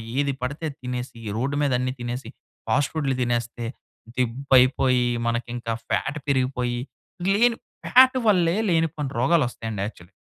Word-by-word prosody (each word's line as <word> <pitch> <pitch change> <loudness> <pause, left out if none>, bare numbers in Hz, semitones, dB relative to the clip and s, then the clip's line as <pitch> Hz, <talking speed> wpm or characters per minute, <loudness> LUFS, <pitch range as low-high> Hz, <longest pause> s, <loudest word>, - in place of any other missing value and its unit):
ఏది 140 0 +1
పడితే 140 +5 -4
అది 140 - -11
తినేసి, 125 -1 -5 0.2
రోడ్డు 140 +3 -1
మీద 140 - +1
అన్ని 130 0 -1
తినేసి, 120 +2 -4 0.4
ఫాస్ట్ 145 +1 +2
ఫుడ్‌లు 140 -4 0
తినేస్తే 120 -1 -2 0.5
దిబ్బైపోయి, 125 0 +3 0.2
మనకింకా 120 0 -2 0.2
ఫ్యాట్ 145 +3 -1
పెరిగిపోయి, 125 -2 0 0.5
గ్లెను 230 +4 +4 0.3
ఫ్యాట్ 260 +1 +6
వల్లే 175 -3 +4
లేనిపోనీ 160 -4 0
రోగాలోస్తాయండి 120 - +1
యాక్చలి. 90 -4 -12
130 Hz, 125 wpm, -24 LUFS, 120-145 Hz, 0.5 s, ఫ్యాట్